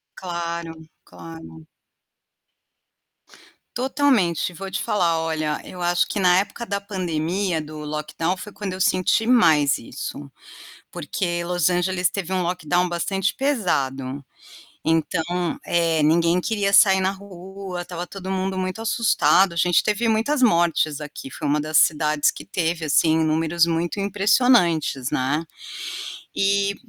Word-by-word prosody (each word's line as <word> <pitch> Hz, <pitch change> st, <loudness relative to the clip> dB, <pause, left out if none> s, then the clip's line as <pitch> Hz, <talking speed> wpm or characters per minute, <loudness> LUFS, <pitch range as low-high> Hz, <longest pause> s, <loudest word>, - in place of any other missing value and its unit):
Claro, 170 Hz, -2 st, -5 dB, 0.3 s
claro. 80 Hz, -2 st, -12 dB, 2.1 s
Totalmente, 245 Hz, -, +1 dB
vou 190 Hz, +2 st, -7 dB
te 195 Hz, -, -3 dB
falar 175 Hz, -7 st, +1 dB
olha, 155 Hz, -2 st, -2 dB
eu 180 Hz, -, -10 dB
acho 175 Hz, 0 st, +1 dB
que -, -, -3 dB
na 180 Hz, -1 st, +4 dB
época 210 Hz, +4 st, -3 dB
da 200 Hz, -2 st, -2 dB
pandemia 180 Hz, -2 st, -2 dB
do 155 Hz, 0 st, -9 dB
lockdown 155 Hz, +4 st, -3 dB
foi 210 Hz, +2 st, -9 dB
quando 200 Hz, -2 st, -5 dB
eu 185 Hz, -, -7 dB
senti 185 Hz, +4 st, +2 dB
mais 160 Hz, -, +4 dB
isso. 140 Hz, +4 st, -7 dB, 0.6 s
Porque 175 Hz, -2 st, -3 dB
Los 175 Hz, -1 st, +1 dB
Angeles 180 Hz, 0 st, +1 dB
teve 190 Hz, -2 st, -5 dB
um 185 Hz, -1 st, +1 dB
lockdown 180 Hz, 0 st, 0 dB
bastante 195 Hz, +3 st, -1 dB
pesado. 140 Hz, -, -1 dB, 0.6 s
Então, 160 Hz, +1 st, +1 dB, 0.4 s
eh, 165 Hz, -2 st, +1 dB
ninguém 170 Hz, +3 st, +3 dB
queria 205 Hz, -1 st, -1 dB
sair 195 Hz, -1 st, +6 dB
na 190 Hz, -, +2 dB
rua, 190 Hz, -1 st, -8 dB
estava 175 Hz, 0 st, -6 dB
todo 190 Hz, 0 st, -8 dB
mundo 190 Hz, 0 st, -2 dB
muito 185 Hz, +3 st, -3 dB
assustado, 195 Hz, -6 st, +3 dB
a 170 Hz, -, -10 dB
gente 175 Hz, +1 st, +3 dB
teve 215 Hz, +2 st, 0 dB
muitas 235 Hz, +6 st, +1 dB
mortes 170 Hz, -, +2 dB
aqui, 150 Hz, -2 st, -8 dB
foi 145 Hz, -, -6 dB
uma 150 Hz, +1 st, +1 dB
das 155 Hz, +1 st, -2 dB
cidades 150 Hz, -1 st, +3 dB
que -, -, -11 dB
teve 165 Hz, -2 st, -2 dB
assim 160 Hz, +2 st, +3 dB
números 160 Hz, +2 st, +2 dB
muito 170 Hz, +4 st, -2 dB
impressionantes, 195 Hz, -, +2 dB
né. 140 Hz, +5 st, 0 dB, 0.9 s
E 200 Hz, 0 st, +1 dB
175 Hz, 135 wpm, -22 LUFS, 160-195 Hz, 2.1 s, sair